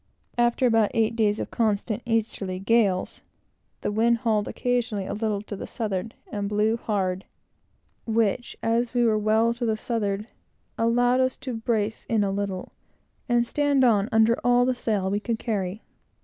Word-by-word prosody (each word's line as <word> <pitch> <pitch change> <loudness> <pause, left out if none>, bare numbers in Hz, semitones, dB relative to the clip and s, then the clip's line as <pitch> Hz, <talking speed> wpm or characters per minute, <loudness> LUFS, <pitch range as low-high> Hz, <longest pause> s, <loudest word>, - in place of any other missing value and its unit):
After 240 +2 +3
about 225 -3 +4
eight 225 0 +2
days 215 -2 +1
of - - -5
constant 215 0 0
easterly 215 -5 -1
gales, 195 -2 +1 0.6
the - - -1
wind 230 +3 +3
hauled 220 -3 0
occasionally 245 -5 -1
a - - -4
little 210 -2 -2
to 210 - -6
the - - -7
southward, 215 -1 -3 0.2
and 200 -1 -2
blew 210 +2 +2
hard, 195 -5 -2 0.8
which, 225 +1 0
as 230 +2 0
we 240 -1 +3
were 215 -2 +3
well 220 +2 +2
to 240 +1 -6
the 220 -2 +1
southward, 210 -3 -2 0.5
allowed 245 +2 +2
us 260 0 +1
to 255 - -5
brace 225 -1 -2
in 220 -3 +2
a 195 - 0
little 195 -2 -3 0.6
and 240 0 +3
stand 285 +1 +2
on, 215 -4 +3
under 225 +1 +4
all 245 0 +4
the 255 - +2
sail 210 -6 -1
we 205 - +1
could 230 +1 -2
carry. 205 -3 -3
225 Hz, 165 wpm, -25 LUFS, 205-235 Hz, 0.8 s, about